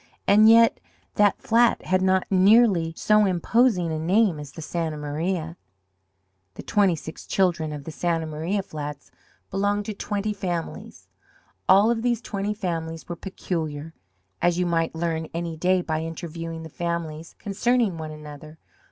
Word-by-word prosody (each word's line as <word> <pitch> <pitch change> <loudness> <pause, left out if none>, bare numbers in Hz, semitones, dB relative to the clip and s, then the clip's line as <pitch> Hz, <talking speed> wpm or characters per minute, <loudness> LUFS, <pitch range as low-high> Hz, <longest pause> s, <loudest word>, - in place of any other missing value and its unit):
And 215 +2 +7
yet 230 0 +6 0.3
that 205 -1 +3
flat 235 +1 +3
had 185 0 +2
not 190 0 +2
nearly 195 -3 +5
so 210 0 +4
imposing 185 0 +2
a 155 - -2
name 185 0 +2
as 145 -2 -8
the 160 - -9
Santa 160 -1 -3
Maria. 160 +3 -3 1.0
The - - -8
twenty 200 -5 +2
six 160 0 -9
children 170 -5 +1
of 145 -2 -6
the 160 - -7
Santa 165 0 -1
Maria 160 +6 -2
flats 150 -3 -7 0.4
belonged 205 +1 0
to 215 - -4
twenty 205 +1 -3
families. 175 -4 -5 0.6
All 200 +4 +6
of 230 -1 -1
these 240 -1 +1
twenty 205 -2 -3
families 165 -5 -4
were 175 - -4
peculiar, 160 -4 -5 0.5
as 175 0 +2
you 180 - +1
might 165 -1 0
learn 160 -1 -2
any 170 -1 -3
day 180 +2 +1
by 155 -1 -2
interviewing 165 0 -6
the 160 - -8
families 165 -1 -4
concerning 210 -2 0
one 155 -1 -5
another. 150 0 -10
175 Hz, 150 wpm, -24 LUFS, 160-200 Hz, 1.0 s, And